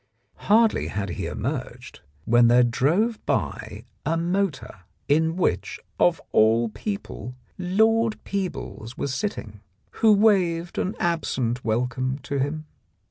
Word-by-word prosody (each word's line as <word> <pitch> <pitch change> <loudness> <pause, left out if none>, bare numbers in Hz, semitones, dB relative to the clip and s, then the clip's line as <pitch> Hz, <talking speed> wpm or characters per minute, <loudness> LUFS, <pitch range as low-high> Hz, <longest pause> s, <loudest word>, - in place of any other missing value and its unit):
Hardly 220 +1 +4
had 100 -1 -3
he 85 - -4
emerged - - -5 0.3
when 120 +1 +5
there 120 +1 +6
drove 170 - +1
by - - -2 0.2
a 165 - 0
motor 170 - -2 0.3
in 160 +3 +2
which, 180 - -1 0.2
of 175 -2 +3
all 115 +2 +4
people, 125 - -6 0.2
Lord 220 +5 +2
Peebles 180 - -5
was 140 - -2
sitting, 110 - -4 0.4
who 220 - +6
waved 185 -5 +2
an 190 - -2
absent 130 -8 -1
welcome 125 +3 -1
to 140 +2 -3
him. 150 +3 -2
160 Hz, 120 wpm, -24 LUFS, 120-195 Hz, 0.4 s, there